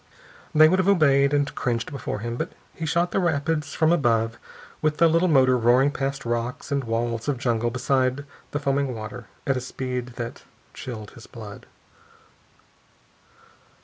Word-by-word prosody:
They 155 Hz, +1 st, +8 dB
would 185 Hz, +4 st, +2 dB
have 185 Hz, -, +2 dB
obeyed 140 Hz, -7 st, +4 dB
and 145 Hz, -1 st, +1 dB
cringed 120 Hz, -2 st, -2 dB
before 135 Hz, -6 st, -4 dB
him. 115 Hz, +1 st, -3 dB
But -, -, -4 dB, 0.2 s
he 165 Hz, -, -5 dB
shot 170 Hz, +3 st, +1 dB
the -, -, +1 dB
rapids 150 Hz, -3 st, 0 dB
from 160 Hz, 0 st, +3 dB
above, 115 Hz, -7 st, +1 dB, 0.4 s
with 155 Hz, -1 st, +1 dB
the 170 Hz, -, +6 dB
little 165 Hz, +3 st, +3 dB
motor 130 Hz, -5 st, +5 dB
roaring 125 Hz, +4 st, +4 dB
past 135 Hz, -1 st, -3 dB
rocks 120 Hz, +4 st, -3 dB
and 140 Hz, -1 st, 0 dB
walls 115 Hz, +1 st, -2 dB
of 145 Hz, -3 st, 0 dB
jungle 120 Hz, -1 st, 0 dB
beside 130 Hz, +2 st, 0 dB, 0.2 s
the -, -, -2 dB
foaming 140 Hz, -2 st, 0 dB
water, 110 Hz, +1 st, -7 dB, 0.2 s
at 135 Hz, -1 st, +1 dB
a -, -, -2 dB
speed 125 Hz, -1 st, -4 dB
that 120 Hz, -1 st, -6 dB, 0.3 s
chilled 110 Hz, -5 st, -7 dB
his 115 Hz, -, -13 dB
blood. 105 Hz, -3 st, -10 dB
130 Hz, 160 wpm, -24 LUFS, 120-145 Hz, 0.4 s, They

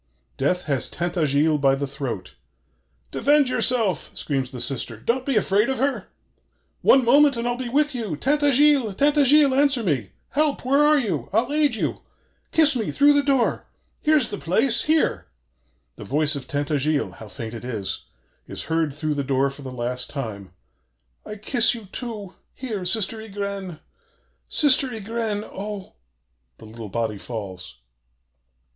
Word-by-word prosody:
Death 180 Hz, +7 st, 0 dB
has 140 Hz, -4 st, -1 dB
Tintagiles 155 Hz, -3 st, +1 dB
by 135 Hz, -1 st, +4 dB
the 140 Hz, +1 st, -2 dB
throat. 135 Hz, -9 st, -6 dB, 0.8 s
'Defend 290 Hz, -2 st, +3 dB
yourself!' 235 Hz, -7 st, +1 dB
screams 135 Hz, -3 st, -2 dB
the 130 Hz, -, -8 dB
sister: 120 Hz, -3 st, -3 dB
'don't 250 Hz, -, -1 dB
be 275 Hz, -, +1 dB
afraid 210 Hz, +2 st, +2 dB
of 265 Hz, -, -1 dB
her! 275 Hz, +2 st, -1 dB, 0.7 s
One 265 Hz, -2 st, +5 dB
moment 280 Hz, +2 st, +5 dB
and 235 Hz, +1 st, -2 dB
I'll 240 Hz, -, 0 dB
be 245 Hz, -1 st, -5 dB
with 295 Hz, +3 st, +1 dB
you! 220 Hz, -10 st, -3 dB
Tintagiles? 285 Hz, -, +3 dB
Tintagiles? 290 Hz, 0 st, +4 dB
Answer 275 Hz, -3 st, +2 dB
me! 130 Hz, -, -1 dB, 0.2 s
Help! 295 Hz, -2 st, 0 dB
Where 275 Hz, +3 st, +3 dB
are 300 Hz, 0 st, +5 dB
you? 180 Hz, -, -2 dB
I'll 230 Hz, +8 st, +1 dB
aid 295 Hz, -5 st, +2 dB
you! -, -, -2 dB, 0.5 s
kiss 310 Hz, -3 st, +4 dB
me! 225 Hz, -4 st, -1 dB
through 290 Hz, +1 st, +4 dB
the 285 Hz, -, +4 dB
door! 275 Hz, -4 st, 0 dB, 0.3 s
here's 300 Hz, -6 st, +3 dB
the 205 Hz, -, -5 dB
place! 225 Hz, +8 st, +1 dB
here!' 300 Hz, -, +1 dB, 0.7 s
The -, -, -8 dB
voice 150 Hz, +2 st, +2 dB
of 135 Hz, -2 st, -6 dB
Tintagiles 145 Hz, -, -1 dB
how 110 Hz, -, -10 dB
faint 115 Hz, 0 st, -7 dB
it 115 Hz, -, -8 dB
is! 110 Hz, -6 st, -4 dB, 0.4 s
is -, -, -6 dB
heard 160 Hz, -3 st, -1 dB
through 155 Hz, 0 st, -2 dB
the 145 Hz, -1 st, -2 dB
door 135 Hz, 0 st, +1 dB
for 140 Hz, -, -11 dB
the 130 Hz, -2 st, -7 dB
last 125 Hz, 0 st, -3 dB
time: 110 Hz, -9 st, -6 dB, 0.8 s
'I 210 Hz, -, -6 dB
kiss 230 Hz, +3 st, +2 dB
you, 225 Hz, -3 st, -9 dB
too 210 Hz, -2 st, -7 dB, 0.2 s
here 220 Hz, -8 st, -5 dB
Sister 220 Hz, +3 st, 0 dB
Ygraine! 200 Hz, -5 st, -5 dB, 0.7 s
Sister 280 Hz, -2 st, +4 dB
Ygraine! 225 Hz, -2 st, -3 dB
Oh!' 200 Hz, 0 st, -6 dB, 0.6 s
The -, -, -14 dB
little 110 Hz, -1 st, -9 dB
body 110 Hz, -1 st, -2 dB
falls. 95 Hz, -6 st, -7 dB
200 Hz, 155 wpm, -23 LUFS, -, 0.8 s, One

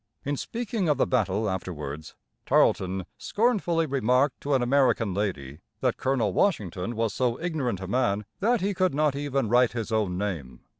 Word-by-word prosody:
In 145 Hz, +1 st, 0 dB
speaking 220 Hz, -, -2 dB
of 150 Hz, -, +3 dB
the -, -, +3 dB
battle 110 Hz, -3 st, 0 dB
afterwards, 80 Hz, -5 st, -5 dB, 0.3 s
Tarleton 95 Hz, 0 st, +2 dB
scornfully 205 Hz, -7 st, +1 dB
remarked 130 Hz, 0 st, +1 dB
to 140 Hz, 0 st, +1 dB
an 130 Hz, -, +2 dB
American 125 Hz, -5 st, +2 dB
lady 80 Hz, -8 st, -3 dB, 0.2 s
that -, -, +1 dB
Colonel 125 Hz, -7 st, 0 dB
Washington 105 Hz, -, 0 dB
was 110 Hz, -2 st, 0 dB
so 125 Hz, -2 st, 0 dB
ignorant 150 Hz, -, -2 dB
a 95 Hz, -, -5 dB
man 105 Hz, -2 st, 0 dB
that 235 Hz, +2 st, +2 dB
he 200 Hz, +2 st, 0 dB
could 185 Hz, -5 st, +1 dB
not 150 Hz, -1 st, +2 dB
even 140 Hz, -3 st, -1 dB
write 120 Hz, +2 st, +3 dB
his 115 Hz, -1 st, -4 dB
own 105 Hz, -5 st, 0 dB
name. 85 Hz, -11 st, -4 dB
120 Hz, 165 wpm, -26 LUFS, 95-145 Hz, 0.3 s, of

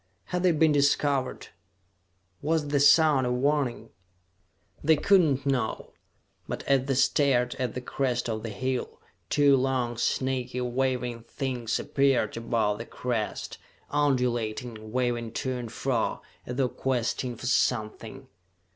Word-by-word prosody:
Had 180 Hz, -, +1 dB
they 180 Hz, -1 st, +4 dB
been 160 Hz, 0 st, +3 dB
discovered? 140 Hz, -2 st, +1 dB, 0.9 s
Was 155 Hz, -1 st, 0 dB
the 145 Hz, -1 st, +2 dB
sound 145 Hz, -2 st, +5 dB
a -, -, 0 dB
warning? 135 Hz, 0 st, 0 dB, 0.9 s
They 160 Hz, +2 st, +5 dB
could 195 Hz, +5 st, +5 dB
not 140 Hz, -4 st, 0 dB
know; 130 Hz, -5 st, -1 dB, 0.5 s
but -, -, -4 dB
as 135 Hz, -1 st, +2 dB
they 135 Hz, -, +1 dB
stared 130 Hz, -2 st, +2 dB
at 125 Hz, -3 st, -2 dB
the 125 Hz, -, -3 dB
crest 125 Hz, -1 st, -1 dB
of 110 Hz, -2 st, -3 dB
the 115 Hz, -, -5 dB
hill, 130 Hz, +4 st, -3 dB, 0.3 s
two 145 Hz, -1 st, +5 dB
long, 130 Hz, -3 st, 0 dB
snaky, 125 Hz, +1 st, -1 dB
waving 125 Hz, -1 st, -1 dB
things 125 Hz, -4 st, -2 dB
appeared 135 Hz, -5 st, +1 dB
above 115 Hz, -3 st, 0 dB
the 115 Hz, -, -5 dB
crest, 120 Hz, -4 st, -3 dB, 0.3 s
undulating, 120 Hz, -5 st, -1 dB
waving 120 Hz, -2 st, -1 dB
to 130 Hz, +1 st, -2 dB
and 120 Hz, -3 st, -5 dB
fro, 125 Hz, -1 st, -1 dB, 0.2 s
as 125 Hz, -, -4 dB
though 130 Hz, -1 st, +2 dB
questing 125 Hz, -1 st, -2 dB
for 120 Hz, -, -9 dB
something. 125 Hz, +1 st, -1 dB
130 Hz, 135 wpm, -27 LUFS, 120-140 Hz, 0.9 s, sound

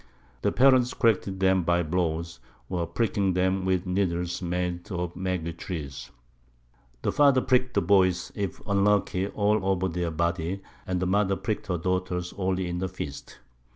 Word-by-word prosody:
The -, -, +1 dB
Parents 130 Hz, -1 st, +4 dB
corrected 100 Hz, -5 st, +1 dB
them 95 Hz, -1 st, +3 dB
by 85 Hz, +1 st, +2 dB
Blows, 85 Hz, 0 st, -2 dB, 0.3 s
or 85 Hz, -2 st, -1 dB
pricking 100 Hz, 0 st, 0 dB
them 95 Hz, +1 st, +1 dB
with 95 Hz, -1 st, +1 dB
Needles 90 Hz, -2 st, -1 dB
made 90 Hz, +1 st, -3 dB
of 90 Hz, -1 st, -3 dB
the -, -, -11 dB
Maguey 90 Hz, -3 st, -2 dB
Tree: 80 Hz, -4 st, -5 dB, 1.1 s
The -, -, +1 dB
Father 140 Hz, -3 st, +5 dB
prick'd 125 Hz, 0 st, +1 dB
the -, -, +3 dB
Boys, 95 Hz, -3 st, +3 dB
if 100 Hz, -5 st, -3 dB
unlucky, 100 Hz, -1 st, +2 dB
all 105 Hz, 0 st, +1 dB
over 95 Hz, -1 st, +1 dB
their 90 Hz, -1 st, -2 dB
Body, 85 Hz, +3 st, -1 dB, 0.2 s
and 90 Hz, -1 st, 0 dB
the 90 Hz, -, 0 dB
Mother 100 Hz, +1 st, +2 dB
prick'd 100 Hz, +3 st, -3 dB
her 90 Hz, -, 0 dB
Daughters 90 Hz, 0 st, -2 dB
only 95 Hz, -1 st, -1 dB
in 85 Hz, 0 st, -3 dB
the 95 Hz, 0 st, -2 dB
Fists. 75 Hz, -6 st, -7 dB
95 Hz, 160 wpm, -27 LUFS, 85-100 Hz, 1.1 s, Father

